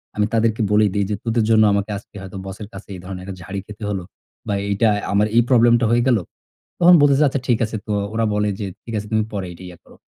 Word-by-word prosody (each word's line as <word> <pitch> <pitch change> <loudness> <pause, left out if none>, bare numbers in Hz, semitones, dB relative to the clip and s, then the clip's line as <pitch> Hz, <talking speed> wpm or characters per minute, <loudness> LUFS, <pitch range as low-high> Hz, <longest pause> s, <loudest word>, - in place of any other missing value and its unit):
আমি 105 - +2
তাদেরকে 115 0 +1
বলেই 105 0 +4
দেই 100 -1 0
যে 105 - 0
তোদের 115 -1 +1
জন্য 110 -1 +5
আমাকে 100 +1 -1
আজকে 100 - -15
হয়তো 95 0 -8
বসের 95 +2 -7
কাছে 95 +1 -10
এই - - -9
ধরনের 90 0 -7
একটা 95 0 -7
ঝাড়ি 100 +2 -5
খেতে 105 0 -10
হলো 95 -3 -3 0.4
বা, 105 - 0 0.2
এইটাই 105 +1 +2
আমার 105 +1 +3
এই 120 - +7
প্রবলেমটা 120 -1 +5
হয়ে 120 0 +3
গেল। 125 -3 +4 0.6
তখন 175 +1 +7
বলতেছে, 145 +1 +4
"আচ্ছা, 135 0 -2
ঠিক 120 -3 +2
আছে।" 110 - -6
তো 105 - -1 0.2
ওরা 115 0 +1
বলে 105 0 +1
যে, 105 - -3 0.2
"ঠিক 115 - -8
আছে, 105 - -5
তুমি 110 -1 +2
পরে 100 -2 -3
এটা 85 - -13
ইয়ে 90 -1 -11
করো।" - - -19
105 Hz, 245 wpm, -20 LUFS, 100-115 Hz, 0.6 s, এই